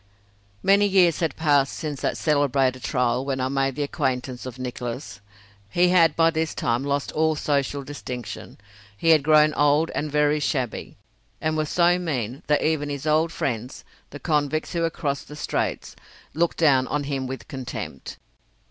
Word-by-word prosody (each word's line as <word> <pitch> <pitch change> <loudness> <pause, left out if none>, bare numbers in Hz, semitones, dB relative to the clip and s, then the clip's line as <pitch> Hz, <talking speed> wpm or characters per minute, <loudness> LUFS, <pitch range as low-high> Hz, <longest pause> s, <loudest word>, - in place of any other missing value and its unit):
Many 200 +1 +5
years 185 -4 +4
had 165 -2 -1
passed 145 -4 +2
since 150 -4 -5
that - - -1
celebrated 135 -4 +1
trial 125 -1 0
when 135 -1 -2
I 130 0 0
made 135 -1 0
the 145 - -1
acquaintance 130 -3 -2
of 125 -1 -8
Nicholas. 125 -4 -6 0.5
He 175 - +3
had 165 -4 +4
by 165 0 +4
this 160 -1 -2
time 120 +2 0
lost 140 0 -1
all 160 0 +1
social 140 -1 -1
distinction. 125 -4 -7 0.4
He 165 - +1
had 160 -2 +6
grown 155 +1 +5
old 145 +3 +2
and 150 0 -3
very 150 0 +2
shabby, 130 -5 -3 0.4
and 155 0 -1
was 155 -1 -1
so 175 0 +3
mean 135 -7 -3
that 150 0 +2
even 155 -2 0
his 140 0 -5
old 155 +2 +2
friends, 125 -4 -4 0.3
the 145 - -9
convicts 155 0 -1
who 170 - -1
had 165 0 0
crossed 140 -2 -3
the 150 - -9
straits, 150 - -3 0.4
looked 170 +2 0
down 135 -5 +4
on 145 -1 -1
him 135 -2 -3
with 130 -3 -7
contempt. 130 -2 -7
145 Hz, 170 wpm, -24 LUFS, 130-155 Hz, 0.5 s, had